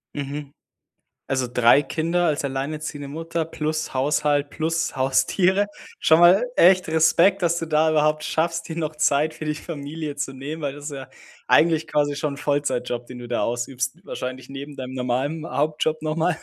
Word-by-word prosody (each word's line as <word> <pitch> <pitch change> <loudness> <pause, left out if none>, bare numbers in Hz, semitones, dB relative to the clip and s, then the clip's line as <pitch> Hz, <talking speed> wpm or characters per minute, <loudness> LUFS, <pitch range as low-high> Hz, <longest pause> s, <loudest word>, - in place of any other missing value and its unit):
Mhm. 145 0 -5 0.7
Also 130 -2 0
3 125 +4 +5
Kinder 170 +5 0
als 145 -2 0
alleinerziehende 145 +1 -4
Mutter 165 +2 -3
plus 155 -2 -3
Haushalt 145 +1 +1
plus 165 -1 -1
Haustiere. 180 +9 +2 0.3
Schon 160 +1 +5
mal 185 +7 +6
echt 185 0 +5
Respekt, 165 +5 +4
dass 170 -1 +2
du 165 - -2
da 155 0 +2
überhaupt 155 0 +2
schaffst, 165 +1 -1
dir 160 - -4
noch 155 -2 -3
Zeit 150 +1 +2
für - - -8
die 150 0 -1
Familie 150 -1 -6
zu 135 -1 -3
nehmen, 145 +4 -6
weil 140 -2 -2
das 145 0 -10
ist 150 - -4
ja 135 -2 -8 0.4
eigentlich 160 -1 +4
quasi 145 -1 +1
schon 145 0 -2
'n - - -14
Vollzeitjob, 135 -5 -1
den 125 - -9
du 120 - -8
da 120 - -1
ausübst, 130 +6 -2
wahrscheinlich 130 0 -6
neben 140 +1 -8
deinem 130 -1 -6
normalen 130 +6 -2
Hauptjob 155 +1 -1
noch 155 0 -1
mal. 165 0 +1
150 Hz, 175 wpm, -23 LUFS, 135-160 Hz, 0.7 s, mal